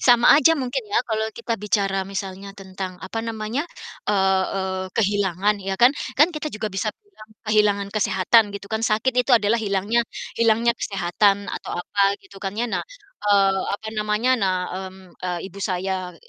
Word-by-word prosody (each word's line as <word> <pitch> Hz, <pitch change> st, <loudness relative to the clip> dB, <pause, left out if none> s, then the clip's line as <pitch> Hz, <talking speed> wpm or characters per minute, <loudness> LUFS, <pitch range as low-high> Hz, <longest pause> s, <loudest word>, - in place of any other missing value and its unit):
Sama 240 Hz, -1 st, +6 dB
aja 325 Hz, +3 st, +6 dB
mungkin 265 Hz, -, -2 dB
ya, 420 Hz, +2 st, +2 dB
kalau 220 Hz, -1 st, -1 dB
kita 235 Hz, 0 st, -3 dB
bicara 195 Hz, -1 st, 0 dB
misalnya 195 Hz, 0 st, -6 dB
tentang, 190 Hz, -1 st, -7 dB
apa 225 Hz, -, -5 dB
namanya, 225 Hz, +6 st, -3 dB, 0.4 s
eee 190 Hz, -2 st, +3 dB
eee, 190 Hz, -1 st, -2 dB
kehilangan, 205 Hz, -1 st, +1 dB
ya 195 Hz, 0 st, -3 dB
kan? 245 Hz, +6 st, +6 dB, 0.2 s
Kan 300 Hz, +5 st, +5 dB
kita 305 Hz, -1 st, -4 dB
juga 215 Hz, 0 st, -3 dB
bisa 195 Hz, +3 st, -1 dB, 0.2 s
bilang 360 Hz, -, -16 dB, 0.2 s
kehilangan 210 Hz, -2 st, +2 dB
kesehatan 205 Hz, +1 st, +3 dB
gitu 200 Hz, -, -11 dB
kan. 220 Hz, -, 0 dB
Sakit 225 Hz, +3 st, +1 dB
itu 250 Hz, 0 st, +4 dB
adalah 225 Hz, +1 st, +1 dB
hilangnya 205 Hz, +3 st, +1 dB, 0.4 s
hilangnya 230 Hz, +1 st, +3 dB
kesehatan 195 Hz, +1 st, +1 dB
atau -, -, -5 dB
apa 200 Hz, -, -3 dB, 0.2 s
gitu 195 Hz, 0 st, -14 dB
kan, 195 Hz, 0 st, -4 dB
ya. 235 Hz, -, 0 dB
Nah -, -, 0 dB, 0.5 s
eee, 195 Hz, -2 st, +4 dB
apa 220 Hz, +2 st, -8 dB
namanya, 210 Hz, +3 st, 0 dB
nah, 190 Hz, -2 st, +2 dB, 0.3 s
mmm, 185 Hz, -1 st, -17 dB
eee, 180 Hz, -1 st, -3 dB
ibu 200 Hz, -, -12 dB
saya 185 Hz, -1 st, -2 dB
205 Hz, 165 wpm, -23 LUFS, 190-225 Hz, 0.5 s, Sama